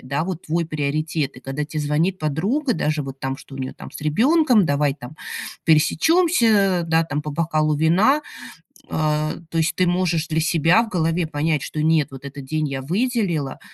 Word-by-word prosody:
да, 140 +4 -2
вот 180 -2 -5
твой 165 +1 0
приоритет. 155 -1 -2
Когда 135 +3 -3
тебе 155 +1 -4
звонит 155 +6 0
подруга, 205 - 0
даже 150 0 -1
вот 135 -1 -8
там, 135 0 -3
что 140 - -13
у - - -8
нее 130 -1 -4
там - - -11
с - - -8
ребенком: 235 - +3
"Давай 145 0 +1
там 140 +1 -11 0.5
пересечёмся, 205 - +3
да, 165 0 +2
там, 150 -2 -3
по 150 - -5
бокалу 155 0 0
вина". 185 - +3 0.7
А, 155 0 0
то 165 - -3
есть 160 0 +1
ты 185 - +2
можешь 175 -2 0
для 160 0 0
себя 165 +6 +3
в 230 - -7
голове 165 -2 0
понять, 155 0 0
что 155 - -4
нет, 160 -1 +2
вот 135 +1 -10
этот 140 0 -8
день 155 +2 -1
я 135 -1 -4
выделила, 180 - -1
160 Hz, 185 wpm, -22 LUFS, 150-180 Hz, 0.7 s, ребенком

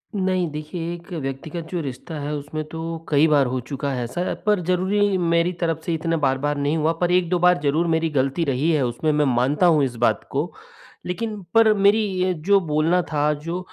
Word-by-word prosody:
नहीं, 185 -2 0
देखिए 160 +3 -5
एक 175 +2 -11
व्यक्तिगत 155 +3 -5
जो 175 -2 -2
रिश्ता 135 +3 -7
है 145 +1 -3
उसमें 150 +2 -5
तो 160 +1 -6 0.3
कई 150 +1 +4
बार 140 -2 +4
हो 130 +1 -2
चुका 140 +3 -4
है 125 -2 -2
ऐसा, 175 +10 -3
पर 210 -2 +3
ज़रूरी 195 +2 +2
मेरी 170 0 +2
तरफ 165 -2 -1
से 170 - -1
इतना 165 +1 -1
बार-बार 140 +2 0
नहीं 145 +3 0
हुआ 160 +1 +1
पर 175 0 +2
1-2 180 0 +2
बार 180 -2 +4
ज़रूर 155 +4 +1
मेरी 160 0 -1
गलती 135 +5 +1
रही 140 +4 +1
है 155 -3 +2
उसमें 125 +6 -1
मैं 150 0 +2
मानता 135 +8 +2
हूँ 160 -4 +4
इस 125 -3 -2
बात - - -1
को। 150 +5 -1 0.5
लेकिन 210 +3 -4
पर 225 -1 +6
मेरी 200 +1 +4 0.2
ये 185 0 +2
जो 200 0 +5
बोलना 165 +1 +1
था 150 0 +2
जो 165 +4 -5
160 Hz, 205 wpm, -22 LUFS, 145-180 Hz, 0.5 s, पर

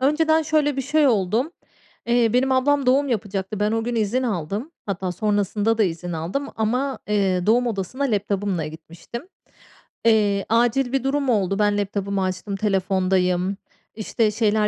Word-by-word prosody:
Önceden 315 +3 +3
şöyle 300 -2 +1
bir 270 - -1
şey 300 +2 +2
oldum: 225 - +1 0.6
eee, 235 -2 +3
benim 260 +2 +2
ablam 275 +1 +2
doğum 275 +2 +3
yapacaktı. 205 -2 -3
Ben 210 +1 +1
o 225 0 0
gün 240 0 -2
izin 225 +4 0
aldım. 205 - -3 0.2
Hatta 190 -2 -2
sonrasında 210 +2 0
da 220 - +4
izin 175 -1 -2
aldım 175 - -3
ama 250 +5 -1
eee, 195 -3 +1
doğum 245 +3 +3
odasına 230 +5 -2
laptop'ımla 200 - -1
gitmiştim. 170 - -9 0.8
Eee, 205 -3 +3
acil 240 +3 +2
bir 270 -2 0
durum 275 0 0
oldu. 195 -3 +1
Ben 205 0 +2
laptop'ımı 200 -1 -1
açtım, 185 +2 -3
telefondayım, 190 -1 +1 0.4
işte, 215 0 0
şeyler, 215 -1 +2
215 Hz, 150 wpm, -22 LUFS, 195-255 Hz, 0.8 s, da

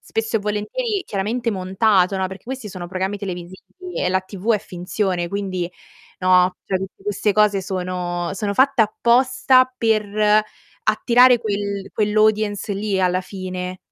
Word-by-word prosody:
spesso 225 0 -2
e - - +2
volentieri 365 - -2
chiaramente 225 +5 -2
montato, 190 0 +2
no, 190 0 0
perché 190 +1 -10
questi 255 -3 -6
sono 180 -2 -7
programmi 190 +2 -2
televisivi 190 - -8
e - - +1
la 190 +1 +1
TV 195 +4 -1
è - - +1
finzione 180 -1 -3
quindi, 185 -2 -3 0.5
no, 185 0 +4
cioè 190 -1 -1
tutte 190 +1 -8
queste 205 +1 0
cose 210 -2 +3
sono 180 -2 -3
sono 200 +1 -2
fatte 275 +2 +3
apposta 255 +3 +3
per 215 -2 +2 0.5
attirare 245 +3 +5
quel 200 -2 -3
quell'audience 215 -1 +1
lì 200 0 -1
alla 185 0 +2
fine. 185 -1 -6
200 Hz, 140 wpm, -21 LUFS, 185-220 Hz, 0.5 s, attirare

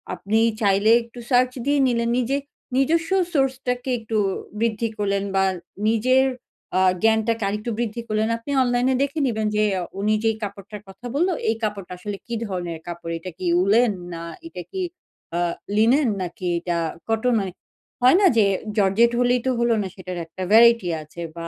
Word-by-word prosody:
আপনি 215 +3 0 0.2
চাইলে 200 +1 +3
একটু 235 +1 -12
সার্চ 250 -1 +4
দিয়ে 285 0 +2
নিলেন 235 -1 0
নিজে 260 +3 0 0.4
নিজস্ব 325 +5 +2 0.2
সোর্স 270 -3 +2
টাকে 250 +1 -1
একটু 225 0 -3 0.4
বৃদ্ধি 230 0 0
করলেন 200 -1 0
বা 190 - +4 0.4
নিজের 255 +4 +3 0.5
আ - - +3 0.2
জ্ঞানটাকে 225 0 +2
আরেকটু 210 +4 -3
বৃদ্ধি 235 0 -2
করলেন। 215 0 0
আপনি 230 +5 -7
অনলাইনে 245 +1 +2
দেখে 280 +3 -2
নিবেন 220 -3 -1
যে 210 - +3 0.2
অ - - -3 0.2
উনি 215 +1 +2
যেই 225 -1 +2
কাপড়টার 200 0 -7
কথা 195 +5 -13
বললো 355 +5 +2 0.2
এই 225 - +2
কাপড়টা 200 -4 -3
আসলে 200 +2 -5
কি 235 - -3
ধরনের 175 -5 -4
কাপড় 170 -1 -6
এটা 185 +2 -7
কি 185 - -3 0.2
উলেন 220 +4 +4 0.2
না 165 0 -6 0.2
এটা 180 - -8
কি 380 - -3 0.6
আ - - +1 0.4
লিনেন 240 +5 +4
নাকি 180 0 -5
এটা 175 0 -2 0.3
কটন 225 +1 +2
এর। - - -6 0.5
হয় 255 +8 +6
না - - +5
যে 215 - +6 0.3
জর্জেট 210 +4 +4
হলেই 245 0 +3
তো - - +3
হলো 235 0 +3
না 195 - -3
সেটার 185 -2 -7
একটা 175 +3 -10
ভ্যারাইটি 230 -3 +6
আছে 155 +3 -10
বা 170 0 -6
220 Hz, 175 wpm, -23 LUFS, 195-245 Hz, 0.6 s, হয়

